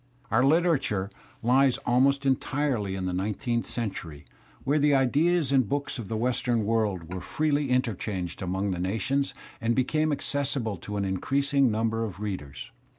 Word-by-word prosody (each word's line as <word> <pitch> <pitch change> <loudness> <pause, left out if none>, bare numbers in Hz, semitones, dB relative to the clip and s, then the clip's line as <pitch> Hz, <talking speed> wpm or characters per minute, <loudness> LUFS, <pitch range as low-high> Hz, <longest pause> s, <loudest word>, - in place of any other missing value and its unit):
Our 110 +3 +4
literature 135 - +2 0.3
lies 130 +2 +4
almost 140 +3 +3
entirely 130 -6 0
in 95 -1 -3
the 90 - -2
nineteenth 105 +5 -1
century 95 -10 -5 0.4
when 145 +2 +2
the 145 -1 +4
ideas 145 +3 +2
and 130 -6 +3
books 140 -2 -2
of 110 - -6
the 110 - -2
western 120 -1 0
world 100 -6 -1
were 95 - -4
freely 150 - 0
interchanged 105 -8 -1
among 95 +2 -1
the 90 - -3
nations 135 +9 -1 0.3
and 115 +1 +1
became 155 +4 +1
accessible 135 -7 -1
to 105 +5 -7
ah - - 0
increasing 135 +8 +1
number 115 +1 0
of 100 -4 -5
readers. 90 -10 -5
120 Hz, 150 wpm, -27 LUFS, 100-140 Hz, 0.4 s, Our